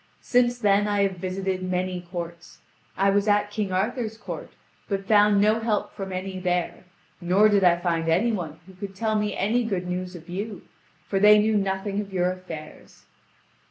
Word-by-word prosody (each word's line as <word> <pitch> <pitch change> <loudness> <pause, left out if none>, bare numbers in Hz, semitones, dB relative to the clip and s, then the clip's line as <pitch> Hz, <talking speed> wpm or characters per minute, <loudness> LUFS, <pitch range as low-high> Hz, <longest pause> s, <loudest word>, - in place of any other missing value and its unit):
Since 245 -1 +2
then 205 -2 +3
I 205 -1 +2
have 190 -2 -1
visited 185 +1 -3
many 185 0 -2
courts; 170 -1 -8 0.4
I 195 +1 +3
was 200 +1 +1
at 205 0 +2
King 205 -2 -2
Arthur's 220 +4 -1
court, - - -7 0.4
but 195 -1 -2
found 205 0 +5
no 215 +2 +3
help 220 -2 -1
from 195 -1 -6
any 185 0 -4
there, 180 0 -2 0.4
nor 185 +5 +4
did 200 -2 +3
I 175 -1 +5
find 165 -2 -1
any 190 +9 +3
one 170 -8 -4
who 190 - -14
could 195 +1 -8
tell 220 +2 -1
me 210 -1 -1
any 235 +5 +1
good 190 -5 -2
news 180 0 -4
of 170 0 -11
you, 200 +3 -5 0.4
for 195 - 0
they 210 +1 +7
knew 215 +1 +2
nothing 195 0 -1
of 200 -1 -9
your 180 -1 +1
affairs." 170 -4 -10
195 Hz, 185 wpm, -25 LUFS, 180-210 Hz, 0.4 s, they